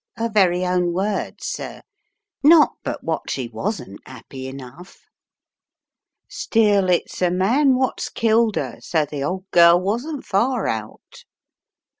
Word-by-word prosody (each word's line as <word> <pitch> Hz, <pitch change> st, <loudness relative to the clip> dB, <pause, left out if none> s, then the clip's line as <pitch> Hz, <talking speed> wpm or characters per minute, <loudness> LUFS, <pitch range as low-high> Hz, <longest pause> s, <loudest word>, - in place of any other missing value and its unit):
'Er 230 Hz, 0 st, -1 dB
very 185 Hz, -4 st, +2 dB
own 180 Hz, -1 st, 0 dB
words, 200 Hz, +3 st, -3 dB
sir, -, -, -5 dB, 0.6 s
not 305 Hz, +1 st, +6 dB
but -, -, -5 dB
what -, -, -3 dB
she 130 Hz, -3 st, -3 dB
wasn't 115 Hz, -, -5 dB
'appy 130 Hz, +1 st, -9 dB
enough 135 Hz, +7 st, -11 dB, 1.3 s
Still, 205 Hz, -4 st, +1 dB
it's 180 Hz, 0 st, -1 dB
a 180 Hz, -, +3 dB
man 240 Hz, +10 st, +2 dB
wot's 260 Hz, 0 st, -1 dB
killed 225 Hz, -1 st, +1 dB
'er, -, -, -4 dB
so 160 Hz, -3 st, -1 dB
the 145 Hz, -1 st, -5 dB
old 185 Hz, +5 st, -4 dB
girl 170 Hz, 0 st, +6 dB
wasn't 240 Hz, -, -3 dB
far 225 Hz, +4 st, 0 dB
out." 110 Hz, -1 st, -6 dB
185 Hz, 130 wpm, -21 LUFS, 160-225 Hz, 1.3 s, not